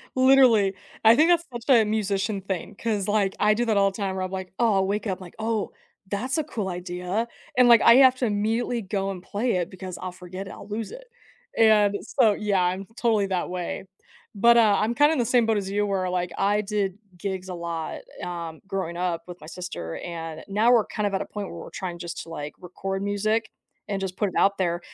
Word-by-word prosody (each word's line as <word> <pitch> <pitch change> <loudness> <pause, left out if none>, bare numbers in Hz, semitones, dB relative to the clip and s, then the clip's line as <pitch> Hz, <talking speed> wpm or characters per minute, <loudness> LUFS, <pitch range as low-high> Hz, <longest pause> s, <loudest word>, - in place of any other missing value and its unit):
Literally. 255 -7 +5 0.3
I 225 +1 +8
think 320 +5 +4
that's 340 -1 +3
such 240 +3 -8
a 225 - +6
musician 205 -1 -1
thing 190 0 -5
'cause 210 -4 -2
like 205 -2 +1
I 210 0 +4
do 240 +2 0
that 220 -3 +1
all 195 0 +4
the 190 - -10
time 195 -2 -2
where 185 - -2
I'm, 185 - -4
like, 190 -1 -6
"Oh" 225 -4 +3
I'll 190 0 +2
wake 210 +2 -2
up 190 0 -3
like, 175 - -11 0.7
"That's 255 +9 -2
a 310 - +1
cool 215 -10 -4
idea," 180 +5 -3 0.3
and, 250 -1 +6
like 235 -1 +8
I 235 - +8
have 260 -1 +7
to 255 - 0
immediately 225 +3 0
go 195 0 -2
and 180 -2 -7
play 225 +3 -1
it 175 0 -2
because 185 -1 -8
I'll 185 -1 -4
forget 185 +2 -8
it - - -8
I'll 200 - -11
lose 215 +1 -4
it, - - -10 0.5
and 210 -2 +5
so, 225 -6 +3
yeah, 200 -3 0
I'm 185 +2 -1
totally 220 -4 +2
that 185 -2 -2
way. 180 +1 -4 0.5
But, 235 +3 +5
uh, 215 -3 +5
I'm 230 +2 0
kinda 295 +2 +5
in 285 - -1
the 240 - +2
same 240 -1 +3
boat 220 -2 +2
as 195 -1 -3
you 205 +1 0
where 190 -2 -1 0.3
I 205 +2 +2
did 200 -2 -2 0.2
gigs 190 -1 -4
a - - -4
lot, 170 -2 -4 0.2
um, 170 -2 -6
growing 190 -4 -3
up 175 -2 -2
with 180 0 -9
my 155 - -11
sister 175 - -6
and 165 -2 -6
now 215 +5 +3
we're 230 -4 +5
kind 210 - -3
of 200 - -4
at 190 - 0
a - - -3
point 205 -2 -6
where 170 - -9
we're - - -8
trying 175 -3 -5
just 170 0 -6
to, 165 - -14
like, 150 -2 -6
record 195 +2 -5
music 215 +2 0 0.4
and 195 -1 -1
just 185 -1 -4
put 205 - +1
it - - -12
out 200 0 +3
there. 175 -2 0
200 Hz, 230 wpm, -25 LUFS, 185-220 Hz, 0.7 s, I